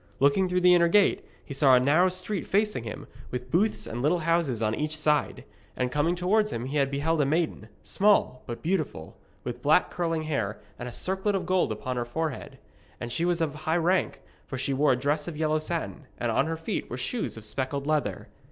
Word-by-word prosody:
Looking 145 +7 +3
through 180 0 +1
the 180 0 +6
inner 170 -1 +5
gate, 200 +3 +3 0.2
he 140 - -7
saw 135 -1 +5
a - - +6
narrow 155 +8 +4
street 185 +2 -3
facing 205 - +1
him, 110 - -6 0.2
with 125 0 -6
booths 205 +6 +1
and 120 - -5
little 155 +6 +3
houses 165 -8 +1
on 110 -1 0
each 155 +4 -2
side; 150 -1 +1 0.3
and 125 0 -1
coming 150 +5 +1
towards 210 +4 +2
him 115 - -3
he 140 +2 +1
beheld 145 +4 0
a - - +2
maiden, 155 -7 -1
small 200 -11 +2
but 120 - -6
beautiful, 155 - -2 0.3
with 120 0 -5
black 155 +6 +3
curling 165 -2 -1
hair 110 -10 -2 0.2
and 120 - -5
a - - -9
circlet 190 - -1
of 195 - -2
gold 185 -10 +1
upon 125 +4 -4
her 120 - 0
forehead; 155 +4 -4 0.4
and 120 0 -5
she 165 +7 0
was 175 -1 +1
of 155 -3 0
high 155 +2 -1
rank, 180 +3 0 0.2
for 130 - -5
she 135 +1 -1
wore 140 0 +3
a - - 0
dress 145 +4 -1
of 165 -3 -5
yellow 155 0 +1
satin, 160 -2 -4
and 120 -1 -1
on 135 +6 +2
her 165 0 -2
feet 160 - -4
were 120 - -4
shoes 130 - -3
of 110 - -9
speckled 135 +4 -2
leather. 145 -11 -1
155 Hz, 215 wpm, -27 LUFS, 130-175 Hz, 0.4 s, the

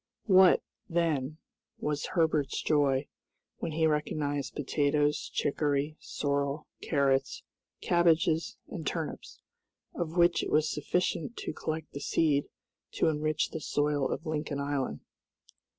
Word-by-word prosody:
What, 190 -4 +6 0.3
then, 155 -4 0 0.4
was 150 -1 -2
Herbert's 155 -5 +2
joy, 145 -2 +2 0.5
when 165 - -3
he 160 +1 +2
recognized 150 -2 -1
potatoes, 145 +1 +1
chicory, 145 +1 0
sorrel, 140 +1 -2 0.2
carrots, 135 -3 +1 0.4
cabbages, 165 -1 +2
and - - -6
turnips, - - -4 0.5
of 170 -1 -4
which 175 0 +4
it - - -3
was 155 0 +2
sufficient 180 +7 -1
to - - -4
collect 155 +1 -4
the 140 - -6
seed 145 -2 +1 0.4
to 165 - +2
enrich 155 0 0
the 160 - -5
soil 145 -1 0
of - - -3
Lincoln 150 -2 -2
Island. 140 -2 -2
150 Hz, 120 wpm, -30 LUFS, 145-160 Hz, 0.5 s, What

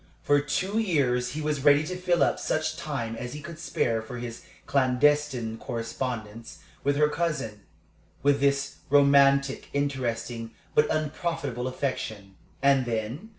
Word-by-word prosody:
For 145 0 +4
two 185 +9 -1
years 125 - +1
he 155 - -3
was 150 -2 -1
ready 145 0 +6
to 180 +4 -4
fill 180 -1 +2
up - - +1
such 155 0 -1
time 120 -7 -4
as 125 +1 -6
he 150 - -6
could 155 +1 -9
spare 115 -8 0
from 120 +2 -7
his 115 -1 -6 0.2
clandestine 130 -3 +2
correspondence 115 -2 -5 0.3
with 140 +1 +2
her 150 +1 +4
cousin, 150 -9 -2 0.6
with 140 0 +4
this 140 0 +1
romantic, 140 -1 +4
interesting, 120 -5 -2 0.2
but 150 - +4
unprofitable 155 -4 -2
affection. 110 -7 -4 0.3
And 135 -2 +4
then? 120 - -3
140 Hz, 140 wpm, -27 LUFS, 120-150 Hz, 0.6 s, ready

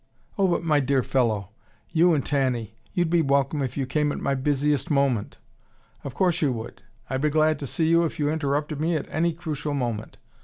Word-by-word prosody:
"Oh, 195 -3 +2
but 175 - 0
my 155 -3 +3
dear 135 -1 +1
fellow! 110 -8 0 0.4
You 170 0 +4
and 140 - -1
Tanny; 130 -6 -1 0.2
you'd 175 -2 0
be 170 -1 +4
welcome 140 0 +1
if 130 0 -3
you 135 - 0
came 150 +3 0
at - - -4
my 140 - 0
busiest 145 +3 0
moment. 140 -7 +1 0.7
Of 135 -3 -7
course 180 0 +1
you 145 -4 +2
would. 115 0 -7 0.3
I'd 130 0 -2
be 150 - +2
glad 155 +1 +2
to 140 - -5
see 160 +5 0
you 170 +1 +4
if 165 - -2
you 145 - 0
interrupted 150 0 -1
me 165 +1 +1
at 150 - -2
any 170 +2 +1
crucial 155 -3 -4
moment. 120 -5 -3
145 Hz, 205 wpm, -25 LUFS, 135-160 Hz, 0.7 s, You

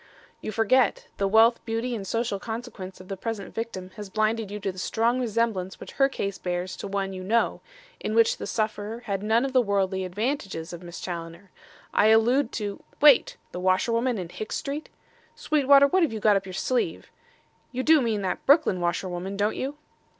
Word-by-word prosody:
"You - - -4
forget. 225 +2 +2
The 200 - +1
wealth, 225 +3 +5
beauty 230 +2 -2
and 200 -4 -5
social 230 -1 -1
consequence 220 -4 -7
of 185 - -12
the 195 - -4
present 205 0 -5
victim 190 -5 -5
has 205 -2 -7
blinded 215 +1 0
you 205 +1 -5
to 195 - -1
the 185 - -10
strong 230 +6 +1
resemblance 225 -5 -1
which - - -9
her 270 0 +3
case 200 -7 -4
bears 180 +1 -3
to - - -5
one 195 -1 -2
you 185 0 -6
know, 230 +5 +1 0.4
in 215 - -3
which 230 0 +4
the - - -6
sufferer 215 +1 -2
had 200 -5 -3
none 225 +4 +2
of 270 - -4
the 255 - +5
worldly 195 -3 0
advantages 190 - -3
of 175 - -8
Miss 175 -1 -9
Challoner. 170 +2 -7 0.4
I 210 - +4
allude 230 +4 +4
to 205 -2 -4
" - - -30
"Wait! 290 -3 +6
the 180 - -5
washerwoman 230 +7 +1
in 180 -3 -5
Hicks 215 +4 -5
Street! 290 +2 -4 0.5
Sweetwater, 280 -2 +5
what 370 +7 +2
have 325 - +2
you 220 - -4
got 210 -1 +4
up 195 -1 -1
your 185 - -7
sleeve? 250 +6 -1 0.6
You 255 0 -2
do 315 0 +6
mean 220 -4 -1
that 185 -1 -2
Brooklyn 280 - +4
washerwoman, 180 +2 -2
don't 205 +1 +1
you?" 275 +3 -4
215 Hz, 195 wpm, -26 LUFS, 190-235 Hz, 0.6 s, Wait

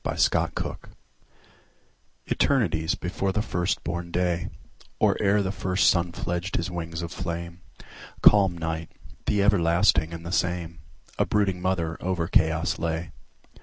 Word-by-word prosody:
Mother - - +2
Night - - -5 1.5
ETERNITIES 85 - +1
before 95 +2 -2
the 105 +2 0
first 90 -4 -1
born 85 0 -4
day, 85 0 -1 0.5
Or - - +3
ere 100 0 +3
the 95 - -1
first 95 -1 +2
sun 85 -1 0
fledged 90 +1 -3
his 85 +3 -2
wings 85 -1 -4
of 85 - -5
flame, 85 -1 -5 0.6
Calm 95 -4 +6
Night, 80 -1 -3 0.4
the 100 -1 +2
everlasting 85 -3 +3
and 85 0 -8
the 85 - -4
same,A 85 -4 -3
brooding 95 -3 +1
mother 85 -3 -1
over 90 -2 -1
chaos 80 0 +2
lay. 80 +1 -2
85 Hz, 130 wpm, -26 LUFS, 85-95 Hz, 1.5 s, Calm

